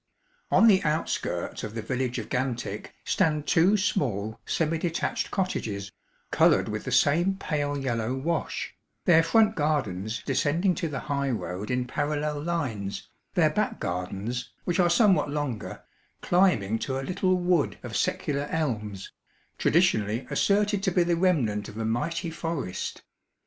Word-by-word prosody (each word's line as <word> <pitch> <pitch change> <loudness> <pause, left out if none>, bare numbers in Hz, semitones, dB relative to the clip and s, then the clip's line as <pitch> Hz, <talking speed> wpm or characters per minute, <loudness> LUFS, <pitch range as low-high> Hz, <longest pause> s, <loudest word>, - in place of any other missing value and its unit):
On - - +5
the 200 -4 +6
outskirts 155 +1 -2
of 105 - -6
the 110 - -3
village 125 +1 -2
of - - -4
Gantick 125 -5 -3
stand 155 -5 +1
two 185 +5 +4
small 115 - -1
semi 165 0 0
detached 170 0 -1
cottages, 105 - -2 0.4
coloured - - +4
with 105 0 -4
the 130 - -3
same 160 +9 +3
pale 145 -6 -2
yellow 120 -3 -1
wash, 160 +5 -2 0.3
their 165 -2 +6
front 220 +5 +3
gardens 120 - -1
descending 150 +7 +1
to 170 - -2
the 145 -3 -4
high 140 -1 -1
road 100 -3 -3
in 125 0 0
parallel 150 +2 -2
lines, 130 -12 -3 0.3
their - - +4
back - - -1
gardens 95 +7 -3
(which 175 +1 -1
are 175 -1 +5
somewhat 190 -4 +4
longer) 145 -7 -4 0.4
climbing 140 - +3
to 135 +2 -2
a 135 - -4
little 185 +3 +1
wood 175 -4 +1
of - - -6
secular 145 0 -1
elms, 105 -11 -2 0.5
traditionally 120 - +2
asserted 205 0 +2
to 195 - +1
be 180 0 +3
the 170 0 +1
remnant 135 - +1
of 105 - -10
a 115 - -2
mighty 165 +9 -1
forest. 160 - -4
145 Hz, 145 wpm, -27 LUFS, 115-170 Hz, 0.5 s, the